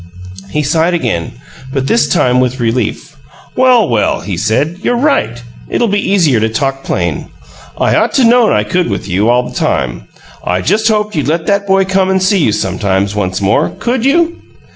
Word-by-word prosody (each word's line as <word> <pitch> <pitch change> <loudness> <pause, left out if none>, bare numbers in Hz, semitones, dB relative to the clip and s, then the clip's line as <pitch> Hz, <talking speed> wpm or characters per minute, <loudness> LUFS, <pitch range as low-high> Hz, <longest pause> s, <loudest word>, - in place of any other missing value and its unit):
He 150 +6 -1
sighed 165 +4 +1
again, 115 - -2 0.4
but 135 -1 -2
this 230 +12 +2
time 125 -7 +2
with 130 +1 -1
relief. 120 +6 -2 0.4
"Well, 250 -3 +4
well!" 115 -3 0
he 100 - -4
said. 115 - -1
"You're 245 - 0
right. 180 - 0 0.3
It'll 235 - 0
be 200 -1 -1
easier 160 - +3
to 110 +1 0
talk 135 +4 -2
plain. 85 -4 -2 0.5
I - - +1
ought - - +2
to 265 - +3
known 235 -1 +4
I 105 - +2
could 175 +11 -1
with - - -4
you, 100 +4 +1
all 125 +1 +2
the - - -11
time. - - -2 0.4
I 90 +1 -1
just 215 - +1
hoped 210 -2 0
you'd 150 -3 -1
let 160 +2 -1
that 200 0 0
boy 195 0 +3
come 190 0 +1
and 190 0 +2
see 190 +1 +2
you 145 - +2
sometimes, 95 0 -1
once 95 -2 -2
more. 100 0 +2
Could 240 0 -1
you?" 330 +5 +1
145 Hz, 190 wpm, -13 LUFS, -, 0.5 s, Well